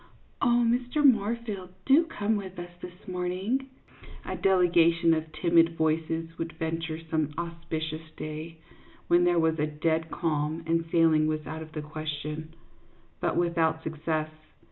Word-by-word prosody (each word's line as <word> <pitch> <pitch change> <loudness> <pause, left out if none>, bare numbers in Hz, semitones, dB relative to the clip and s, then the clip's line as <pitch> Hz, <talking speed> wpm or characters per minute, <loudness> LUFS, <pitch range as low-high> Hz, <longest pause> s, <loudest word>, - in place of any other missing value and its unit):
" - - -35
Oh, 240 -2 +4
Mr. 245 +5 +1
Moorfield, 220 -5 +2 0.2
do 290 +5 +6
come 220 -9 -1
with 190 -3 -5
us 175 0 -7
this 180 0 -11
morn 180 -1 -2
ing! 245 +9 -1 0.3
" - - -17
a - - -3
delegation 170 -3 +4
of 160 0 -2
timid 165 +1 +3
voices 160 +1 0
would 165 -1 -3
venture 160 0 -3
some 160 -2 -1
auspicious 160 -2 -4
day, 155 +2 -6 0.5
when 175 +1 +5
there 175 -1 +3
was 160 -1 +2
a 150 - +2
dead 160 +2 0
calm 160 -1 -1
and 165 0 +1
sailing 160 -2 +4
was 155 -1 -2
out 160 0 -5
of 155 0 -10
the 155 - -4
question, 155 +1 -5 0.6
but - - 0
without 165 -2 +1
success. 155 0 -2
165 Hz, 155 wpm, -28 LUFS, 155-180 Hz, 0.6 s, do